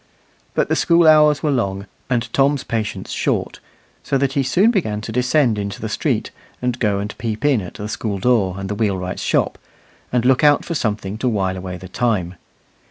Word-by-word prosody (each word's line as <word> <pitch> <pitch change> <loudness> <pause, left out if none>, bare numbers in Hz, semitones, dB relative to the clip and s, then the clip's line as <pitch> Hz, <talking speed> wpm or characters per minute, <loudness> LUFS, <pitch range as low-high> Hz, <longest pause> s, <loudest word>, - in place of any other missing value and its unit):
But - - +2
the - - +1
school 170 -1 +4
hours 150 -2 +5
were 150 - +2
long 100 -6 -1 0.2
and 120 -2 0
Tom's 140 0 +2
patience 110 -3 -3
short, - - -1 0.4
so 135 +1 0
that 135 0 0
he 140 - +2
soon 180 - +3
began 110 - -1
to 110 - -6
descend 125 -1 +2
into 100 0 -4
the - - -4
street, - - -1 0.3
and 125 0 -2
go 105 -3 +1
and 105 +2 -4
peep 115 +2 -3
in 135 -7 +3
at 90 - -9
the 105 - -5
school 105 -1 -3
door 100 -4 +2
and 95 0 -5
the 105 - -2
wheelwright's 95 -4 -2
shop, - - 0 0.5
and 125 -1 +1
look 130 +2 +3
out 145 -1 +5
for 170 - -3
something 105 -6 -2
to 125 - +1
while 95 -4 0
away 90 -1 -6
the 95 +1 -10
time. 95 -4 -1
115 Hz, 200 wpm, -20 LUFS, 100-135 Hz, 0.5 s, hours